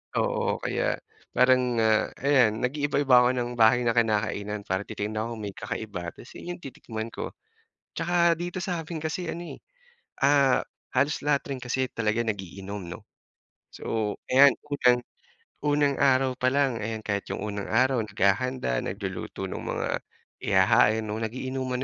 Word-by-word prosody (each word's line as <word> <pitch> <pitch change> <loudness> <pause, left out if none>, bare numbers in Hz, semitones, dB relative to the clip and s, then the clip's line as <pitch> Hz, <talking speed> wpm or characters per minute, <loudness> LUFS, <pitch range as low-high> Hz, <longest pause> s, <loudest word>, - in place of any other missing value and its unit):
Oo, - - 0
kaya - - -1 0.3
parang 125 -1 +3
ah, 110 -1 +3
ayan 125 -6 +3
nag-iiba-iba 140 0 +2
ako 125 - +4
ng 120 -1 -2
bahay 115 +1 +5
na 115 - +2
kinakainan 105 -2 0
para 95 +2 -1
titignan 110 +2 -3
ko 115 - -4
kung 115 - -6
may 100 - -8
kakaiba 90 -6 -5
tas - - -14
'yun 175 - -6
'yung 175 - -7
titikman 115 -6 -6
ko. - - -6 0.6
Tsaka 170 0 +3
dito 175 +2 -4
sa; 175 -2 -2
min 160 0 -6
kasi 160 +2 -3
ano 170 0 -6
eh, - - -19 0.6
ah, 140 -2 +4 0.3
halos 140 +4 +2
lahat 145 -2 +3
rin 135 - -3
kasi 130 +1 -2
talaga 110 +1 0
nag-iinom 100 -2 -5
'no, 85 - -8 0.7
so 110 -2 -2 0.2
ayan 140 +2 +7
bukod 145 -1 -5
diyan, 125 0 +6 0.6
unang 145 -1 +2
araw 130 -1 +4
pa 130 0 +1
lang 135 -4 +1
ayan, 110 0 -4
kahit 100 -1 -2
'yung 105 - -3
unang 100 -1 -4
araw 130 +1 +3
naghahanda, 100 - 0
nagluluto 95 -1 -5
ng - - -5
mga - - -2 0.5
ihahain 105 +3 +4
'no, 110 +1 -4
nag-iinuman 130 +2 -3
125 Hz, 155 wpm, -27 LUFS, 105-140 Hz, 0.7 s, ayan